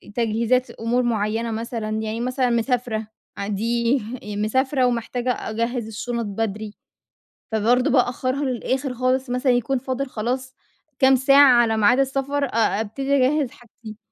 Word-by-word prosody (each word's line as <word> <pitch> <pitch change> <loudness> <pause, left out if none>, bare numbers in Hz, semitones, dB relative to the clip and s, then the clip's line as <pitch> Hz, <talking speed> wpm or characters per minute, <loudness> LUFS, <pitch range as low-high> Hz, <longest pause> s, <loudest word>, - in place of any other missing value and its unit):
تجهيزات 235 +2 +1
أمور 240 +2 -1
معيّنة 225 0 -1
مثلًا، 225 -1 -4
يعني 220 +1 -3
مثلًا 255 0 0
مسافرة 235 -2 -1 0.3
ع 200 - -4
دي 230 +5 +1 0.3
مسافرة 250 +6 0
ومحتاجة 245 +1 -1 0.2
أجهّز 230 +1 -2
الشُنط 235 +2 -4
بدري. 210 0 -4 0.8
فبرضه 240 +5 +2
بأخّرها 255 +2 +1
للآخِر 260 +1 -2
خالص 255 +1 0
مثلًا 250 +1 +1
يكون 245 +2 +1
فاضل 260 +2 -3
خلاص 255 +3 -3 0.4
كام 265 0 +6
ساعة 265 -1 +6
على 225 -2 +1
ميعاد 240 +5 +4
السفر، 275 +1 0
أ 225 -3 +1
أبتدي 270 +6 -1
أجهّز 275 0 +2
حاجتي. 230 -4 -13
245 Hz, 130 wpm, -22 LUFS, 225-260 Hz, 0.8 s, كام